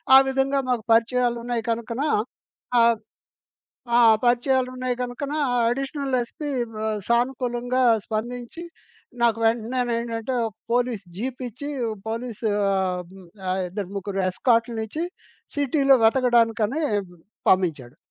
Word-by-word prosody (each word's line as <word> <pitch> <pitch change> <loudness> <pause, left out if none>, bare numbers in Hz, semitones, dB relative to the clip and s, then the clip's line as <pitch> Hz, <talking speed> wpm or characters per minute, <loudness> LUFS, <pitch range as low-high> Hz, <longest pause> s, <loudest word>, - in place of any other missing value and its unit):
ఆ - - +12
విధంగా 270 +1 +1
మాకు 245 -3 0
పరిచయాలున్నాయి 235 0 +1
కనుకన 230 +2 -2 0.8
ఆహ్, 230 0 +4 1.0
ఆ! - - +6 0.3
పరిచయాలున్నాయి 255 +1 +1
గనుకనా 275 +5 -3 0.3
అడిషనల్ 275 +1 -2
ఎస్పీ 295 +5 -7 0.3
బ - - -8 0.3
సానుకూలంగా 245 +1 0 0.2
స్పందించి 240 +7 -4 0.6
నాకు 230 -2 +3
వెంటనేంటంటే 235 +1 -1
ఒక 220 - -7 0.2
పోలీస్ 240 -4 0
జీపిచ్చి, 250 +3 -5 0.4
పోలీసు 230 -1 -4 0.3
ఆహ్, 185 -2 0 0.5
ఆహ్, 185 +1 0
ఇద్దరు 195 +1 -5
ముగ్గురు 195 0 -3
ఎస్కార్ట్‌లనిచ్చి 230 - 0 0.5
సిటీలో 275 -1 +4
వెతకడానికనీ 235 +2 +3 0.7
పంపించాడు. 150 -9 +1
240 Hz, 95 wpm, -24 LUFS, 225-255 Hz, 1.0 s, ఆ